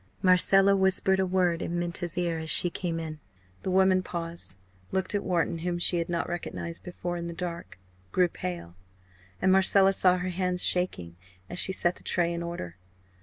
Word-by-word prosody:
Marcella 195 +2 +5
whispered 190 0 +2
a 190 - +1
word 180 -2 +1
in 175 - -3
Minta's 175 -1 -4
ear 170 -2 -1
as 160 0 -4
she 175 - +8
came 170 -2 -3
in. 155 -2 -7 0.4
The - - -4
woman 190 0 +3
paused, 170 - -5 0.4
looked 190 +1 -1
at 205 - -1
Wharton, 170 -2 -1
whom 175 +1 -2
she 175 0 +1
had 170 - -3
not 170 -1 -2
recognised 170 -1 -6
before 175 -1 -5
in 170 0 -5
the 170 - -7
dark 170 - -6 0.3
grew 180 -1 +3
pale 85 - -7 0.7
and 190 - +4
Marcella 195 +1 +5
saw 185 -1 +3
her 180 +1 -3
hands 180 0 -1
shaking 90 - +1 0.3
as - - -3
she - - +1
set 175 -1 0
the - - -19
tray 170 -1 0
in 170 - -4
order. 170 - -6
175 Hz, 185 wpm, -27 LUFS, 170-185 Hz, 0.7 s, she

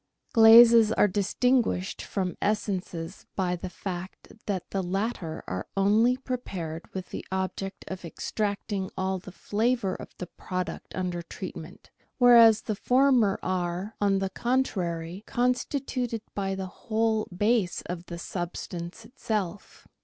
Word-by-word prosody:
Glazes 230 -1 +8
are 215 - +4
distinguished 205 0 +1
from 185 -3 -3
essences 190 -4 -2
by 180 -2 0
the 180 +1 -6
fact 185 0 -7
that 195 -4 -3
the 195 - 0
latter 185 -3 -3
are 90 0 -4
only 220 +6 +4
prepared 185 -11 -5
with 185 -1 -6
the - - -5
object 190 +1 -3
of 190 -1 -6
extracting 200 +2 -3
all 190 0 -1
the 190 - -11
flavour 215 +1 0
of - - -8
the 180 - -5
product 180 +1 -5
under 180 -2 -2
treatment, 170 -1 -9 0.3
whereas 235 -3 +7
the 215 - -2
former 250 -4 +3
are, 185 +2 -2
on 200 -1 +3
the 195 0 -2
contrary, 185 -8 -1
constituted 250 -2 -1
by 195 -1 -2
the 190 0 -4 0.2
whole 220 0 +2
base 205 0 +1
of 180 0 -6
the 170 - -6
substance 175 +2 -5
itself. 210 -7 -4
195 Hz, 130 wpm, -27 LUFS, 180-225 Hz, 0.3 s, Glazes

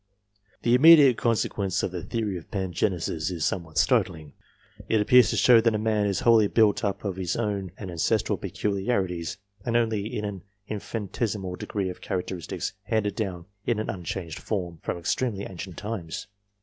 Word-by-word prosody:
The 120 - +3
immediate 145 -1 +8
consequence 100 -5 0
of - - -1
the 90 -1 -4
theory 110 0 -2
of 85 - -8
Pangenesis 90 -4 -1
is 85 -4 -2
somewhat 80 -5 -3
startling. 80 -3 +1 0.6
It 110 - +3
appears 125 +4 +6
to - - -1
show 120 -2 +6
that 115 -1 +2
a - - +2
man 105 -1 +1
is 100 - -1
wholly 115 -3 +5
built 105 -1 +3
up 100 0 -2
of 95 -2 -2
his 90 -2 -2
own 100 -5 -2
and 95 -3 -6
ancestral 85 -2 0
gmdmtiJd&s, 95 -5 -2 0.3
and 120 0 +1
only 110 -3 0
in 105 - -3
an 100 -3 -5 0.3
infinitesimal 105 -2 -3
degree 95 0 -3
of 90 - -8
characteristics 90 -2 -4
handed 105 -2 0
down 95 -6 -3 0.2
in 120 - +2
an 110 - -2
unchanged 90 -3 -5
form, 90 -6 -3
from - - -3
extremely 100 +4 -1
ancient 95 -1 -7
times. 105 -7 -5
100 Hz, 165 wpm, -26 LUFS, 90-110 Hz, 0.6 s, immediate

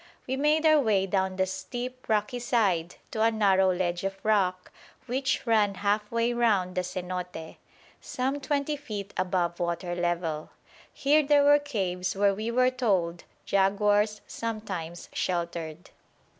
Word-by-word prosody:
We 260 - -2
made 300 +3 +2
our 310 -1 +6
way 210 -7 +2
down 190 -1 0
the 190 0 +1
steep 245 +7 -6
rocky 215 +3 0
side 195 -9 +1 0.2
to 220 - -2
a 225 - +5
narrow 195 -4 +3
ledge 175 -1 -1
of 195 0 -3
rock 185 -4 +1 0.3
which 265 +3 -1
ran 215 -4 +3
half 210 +2 0
way 230 +1 +1
round 205 -7 +2
the 185 - 0
cenote, 180 -2 -6 0.4
some 265 +3 -2
twenty 285 +1 -1
feet 210 -9 -7
above 180 -2 -1
water 175 0 -2
level. 175 -3 -2 0.4
Here 295 +2 +3
there 290 0 +4
were 290 +1 +6
caves 190 -11 -2
where 200 0 +3
we 215 +3 -3
were 255 +2 +3
told 190 -9 0 0.2
jaguars 205 +2 +2
sometimes 195 -7 -5
sheltered. 170 -1 -3
200 Hz, 145 wpm, -27 LUFS, 180-240 Hz, 0.4 s, our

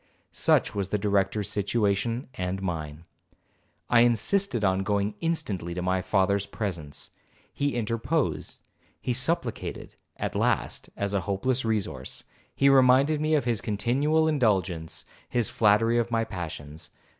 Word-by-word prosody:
Such - - +2
was 100 -2 -2
the 105 - 0
Director's 100 0 0
situation 105 +3 0
and 90 -2 -3
mine. 80 -4 -5 0.8
I 120 - +5
insisted 120 - +2
on 95 -1 +2
going 100 +1 0
instantly 105 - -2
to 90 - -3
my 95 0 +1
father's 100 +1 +1
presence. 85 -9 -5 0.4
He 140 -3 -1
interposed, 115 +7 -1 0.4
he 125 - -1
supplicated; 125 -1 -1 0.2
at - - -3
last, - - 0
as 100 0 -2
a 100 - +1
hopeless 125 +7 0
resource, 100 - -3 0.3
he 140 - +3
reminded 135 +3 +5
me 155 0 +2
of 140 -5 +1
his 115 -4 0
continual 140 +9 +1
indulgence, 95 - 0 0.2
his 120 -4 +1
flattery 115 +2 +3
of 120 0 -1
my 115 -1 +1
passions. 80 -6 -7
105 Hz, 135 wpm, -27 LUFS, 95-125 Hz, 0.8 s, I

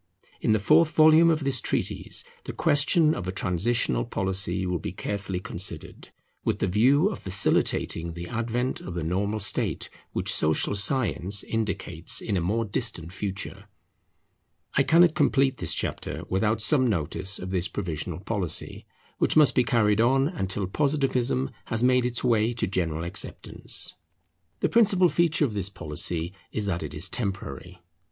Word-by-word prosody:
In - - +1
the 110 - +4
fourth 155 +10 +3
volume 160 +2 +6
of 155 -2 +1
this 135 -3 0
treatise - - -2 0.2
the - - -6
question 150 +2 +3
of 95 - -5
a - - -1
transitional 90 - 0
policy 95 +2 -1
will 90 -1 -2
be 80 - -5
carefully 95 0 -4
considered, 85 -2 -5 0.3
with - - 0
the - - -1
view 130 - +3
of 210 - -6
facilitating 85 -3 0
the 85 +1 -7
advent 120 +3 -2
of 90 - -7
the 85 - -3
normal 100 +6 -1
state 100 - +1 0.2
which - - -1
social 80 +6 +1
science 100 -3 +2
indicates 95 -7 -1
in 105 - -3
a 90 - 0
more 110 +7 -1
distant 85 -4 -3
future. 100 0 -5 1.1
I - - +3
cannot 170 0 +5
complete 135 -4 +2
this - - -1
chapter - - -4
without 105 +3 0
some 130 -2 +4
notice 95 0 -1
of 90 +1 -7
this 90 0 0
provisional 90 -3 -5
policy, 95 -6 -2 0.3
which - - +2
must 150 -5 +6
be 125 - +3
carried 110 -3 +2
on 135 +4 +3
until 100 - -3
Positivism 135 +2 0
has 115 +1 -2
made 125 -1 +3
its 120 -1 -3
way 115 -2 +2
to 115 - -1
general 85 -4 -2
acceptance. 90 +4 0 0.7
The - - +1
principal 200 -6 +4
feature 170 -3 +2
of 115 - -4
this 100 -2 -3
policy 85 0 -3 0.2
is 105 - -3
that 90 -4 -2
it 75 - -6
is 80 +5 +1
temporary. 95 - -5
100 Hz, 160 wpm, -26 LUFS, 90-130 Hz, 1.1 s, volume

